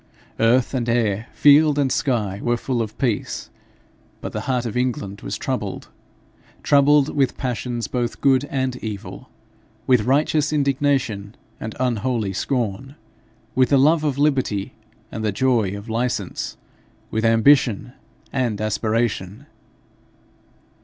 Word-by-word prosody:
Earth 120 +3 +3
and 120 -3 -1
air, 115 -2 0
field 150 0 +5
and 140 -3 +1
sky 105 -9 0
were 120 0 +1
full 125 -1 -2
of 110 -2 -5
peace. 120 -6 -2 0.7
But - - -6
the 105 - -4
heart 125 -2 0
of 115 - -4
England 110 -5 -2
was - - -4
troubled - - -4 0.7
troubled 145 0 +4
with 135 -3 +1
passions 120 -2 -3
both 120 -2 -3
good 135 0 +3
and 130 -3 -2
evil 105 -4 -7 0.6
with 125 -3 +4
righteous 150 +2 +2
indignation 135 -8 0 0.2
and 110 0 -6
unholy 120 -4 -1
scorn, 125 +4 -2 0.6
with 130 -1 +3
the 140 - +4
love 155 +4 +4
of 145 -3 0
liberty 135 -9 0 0.4
and 110 - -5
the 105 - +1
joy 110 -3 +1
of 100 +3 -10
license, 120 +2 -3 0.5
with 110 - -1
ambition 115 0 +3 0.4
and 120 -6 -1
aspiration. 110 +1 -1
125 Hz, 125 wpm, -22 LUFS, 110-135 Hz, 0.7 s, field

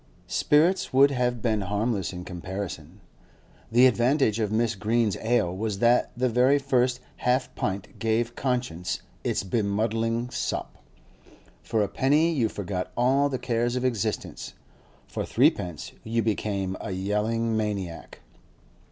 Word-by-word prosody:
Spirits 165 +6 +2
would 140 +2 +6
have 125 -3 -1
been 110 -3 +1
harmless 105 +1 -1
in 90 -1 -7
comparison. 90 -1 -6 0.7
The 120 +3 +6
advantage 125 -2 +3
of 110 -2 0
Mrs. 110 -1 0
Green's 110 0 +1
ale 110 -6 +1
was 105 0 -2
that 120 +3 +3
the 130 +1 +2
very 125 +4 +4
first 125 -2 +1 0.2
half 125 +1 0
pint 100 0 -4
gave 115 +1 0
conscience 125 -10 -2 0.2
its - - 0
bemuddling 115 +3 0
sop; - - -4 0.8
for 110 -2 0
a - - 0
penny 150 - +2
you 120 -7 +1
forgot 95 -3 -4
all 135 +4 +3
the 130 - -2
cares 120 0 -1
of 125 0 -1
existence; 115 -6 -2 0.5
for - - -4
threepence 85 -4 +1
you 115 +1 0
became 100 -3 -1
a - - -5
yelling 105 +4 -1
maniac. 100 -6 -4
115 Hz, 135 wpm, -26 LUFS, 100-125 Hz, 0.8 s, would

